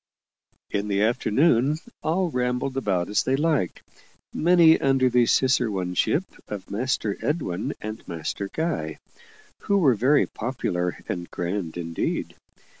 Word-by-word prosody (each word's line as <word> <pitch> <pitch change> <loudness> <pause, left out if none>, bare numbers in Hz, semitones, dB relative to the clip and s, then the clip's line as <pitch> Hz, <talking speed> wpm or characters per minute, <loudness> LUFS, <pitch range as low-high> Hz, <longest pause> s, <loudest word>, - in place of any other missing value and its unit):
In 100 0 -1
the 100 0 +1
afternoon, 125 +5 +2 0.2
all 175 +2 0
rambled 125 +1 -1
about 95 -9 0
as 105 - +2
they 130 - +1
liked 150 - 0 0.5
many 170 -1 +5
under 135 -2 +3
the 120 -1 +4
ciceroneship 110 - +1 0.2
of 100 -2 -7
Master 110 -1 -1
Edwin 125 - -2
and 110 +1 -7
Master 85 +4 -4
Guy, 155 - -2 0.6
who 200 - +1
were 150 -9 +5
very 130 +7 +3
popular 90 -7 -3
and 85 -1 -4
grand 90 -1 -3
indeed. 85 -1 -3
120 Hz, 120 wpm, -25 LUFS, 95-140 Hz, 0.6 s, many